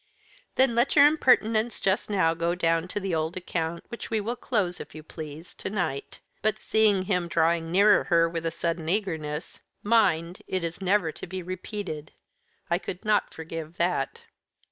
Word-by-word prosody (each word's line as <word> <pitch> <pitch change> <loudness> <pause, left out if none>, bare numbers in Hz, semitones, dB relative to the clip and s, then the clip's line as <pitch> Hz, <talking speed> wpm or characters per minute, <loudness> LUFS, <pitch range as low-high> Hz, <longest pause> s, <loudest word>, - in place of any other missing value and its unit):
"Then 260 -2 +4
let 240 +4 +2
your 285 -1 +9
impertinence 240 -6 +3
just 195 +2 0
now 185 -5 +3
go 170 +1 0
down 165 -1 +1
to 205 - -3
the 190 -3 -3
old 160 +2 -1
account, 170 -2 -3
which 235 - -7
we 220 - +1
will 225 +4 -2
close, 200 -9 -1
if 155 - -9
you 155 - -8
please, 155 +1 -9
to - - -6
night. 175 -9 -3 0.2
But," 215 0 +1
seeing 215 -4 +3
him 180 -3 0
drawing 165 0 +1
nearer 200 +3 +5
her 165 -2 +4
with 165 0 -3
a - - +2
sudden 165 0 -2
eagerness, 160 -6 -2 0.2
"mind, 180 -6 +2
it 185 -2 -2
is 170 +2 -4
never 190 -3 +2
to - - -9
be 185 -1 -5
repeated. 185 -3 -6 0.5
I 170 +1 +1
could 180 +1 -7
not 210 -1 +2
forgive 160 0 -7
that." 170 -6 -1
180 Hz, 175 wpm, -27 LUFS, 165-205 Hz, 0.5 s, your